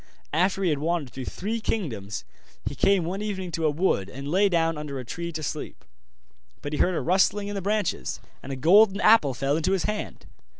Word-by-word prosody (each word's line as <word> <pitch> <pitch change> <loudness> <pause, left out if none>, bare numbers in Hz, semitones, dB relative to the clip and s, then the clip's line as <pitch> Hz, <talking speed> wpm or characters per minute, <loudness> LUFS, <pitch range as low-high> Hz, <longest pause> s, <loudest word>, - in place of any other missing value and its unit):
After 185 +4 +2
he 175 - +3
had 145 - 0
wandered 155 -5 -1
through 130 +1 -6
three 215 - -3
kingdoms, 110 - -3 0.4
he - - -2
came 190 +6 +3
one 190 +4 -3
evening 190 -4 -4
to 160 -1 0
a - - +3
wood, 145 - 0
and 135 +6 -7
lay 195 +6 +3
down 165 -2 +1
under 150 -2 -5
a 125 - -7
tree 170 +8 -5
to 155 -1 -5
sleep. - - -5 0.8
But 145 - -4
he - - -2
heard 180 - +2
a - - 0
rustling 200 +3 +2
in - - -4
the 200 - -3
branches, 210 +2 -1 0.2
and 140 - -8
a - - -2
golden 195 +8 +5
apple 210 - +5
fell 135 +3 0
into 160 +4 +1
his 190 - +1
hand. 210 0 -4
170 Hz, 215 wpm, -26 LUFS, 145-195 Hz, 0.8 s, golden